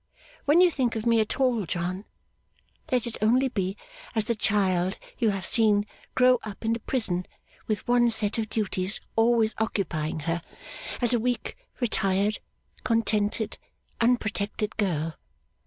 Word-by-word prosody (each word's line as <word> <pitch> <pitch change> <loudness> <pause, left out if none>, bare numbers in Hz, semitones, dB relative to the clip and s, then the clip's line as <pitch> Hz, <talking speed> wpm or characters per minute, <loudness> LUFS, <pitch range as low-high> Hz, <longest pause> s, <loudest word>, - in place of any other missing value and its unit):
When 305 +5 +5
you 360 -1 +6
think 250 -7 0
of 220 0 -3
me 230 -1 +4
at 215 +3 -1
all, 240 -8 +2
John, 180 +4 -3 0.9
let 250 -2 +2
it 235 - -6
only 250 +5 +3
be 195 -4 -2 0.4
as 220 -1 +2
the 235 - +1
child 190 -4 +1 0.2
you 230 -3 +3
have 195 -3 -2
seen 210 -1 +4 0.3
grow 250 -1 +5
up 215 +1 -8
in 225 - +2
the 230 - -2
prison 190 -9 0 0.4
with 215 0 -2
one 240 0 +4
set 220 -1 +2
of 220 -1 -2
duties 200 -3 -1 0.2
always 225 -1 +3
occupying 165 -8 -2
her; 165 +2 -1 0.6
as 240 - +4
a 240 - +3
weak, 245 0 -2 0.2
retired, 205 -3 +1 0.4
contented, 220 -1 0 0.4
unprotected 215 -2 0
girl. 165 -6 -1
220 Hz, 145 wpm, -26 LUFS, 195-235 Hz, 0.9 s, you